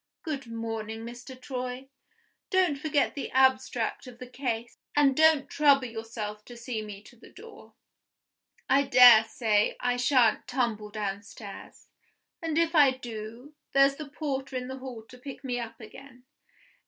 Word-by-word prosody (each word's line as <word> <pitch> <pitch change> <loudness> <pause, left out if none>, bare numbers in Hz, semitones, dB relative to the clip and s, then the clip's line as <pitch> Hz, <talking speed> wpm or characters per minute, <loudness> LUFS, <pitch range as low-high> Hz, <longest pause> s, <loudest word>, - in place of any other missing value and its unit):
Good 285 -6 -4
morning 225 -1 -5
Mr. 245 +2 -10
Troy! 255 0 -5 0.6
Don't 370 -6 +2
forget 290 0 0
the 280 - -5
abstract 260 -2 +1
of 245 -1 -11
the 255 - -8
case; 245 -2 -4 0.2
and 285 -2 +4
don't 315 -2 +4
trouble 280 -3 +4
yourself 225 -2 -6
to 240 - -11
see 235 -1 -4
me 205 -1 -9
to 240 - -17
the 235 - -17
door. 450 +4 -14 0.9
I 275 +1 +4
dare 245 -4 +8
say 220 -2 +1
I 245 0 0
shan't 245 -3 +3
tumble 235 -5 -2
downstairs; 205 0 -7 0.6
and, 325 -2 -2
if 335 0 +2
I 295 -4 +7
do, 240 +1 -8 0.2
there's 275 0 +4
the 305 -2 -8
porter 275 -2 -4
in 250 0 -4
the 265 0 -6
hall 255 -4 -8
to 250 +3 -16
pick 275 +2 -9
me 250 -2 -2
up 230 -1 -7
again. 250 +3 -13
250 Hz, 155 wpm, -28 LUFS, 225-275 Hz, 0.9 s, dare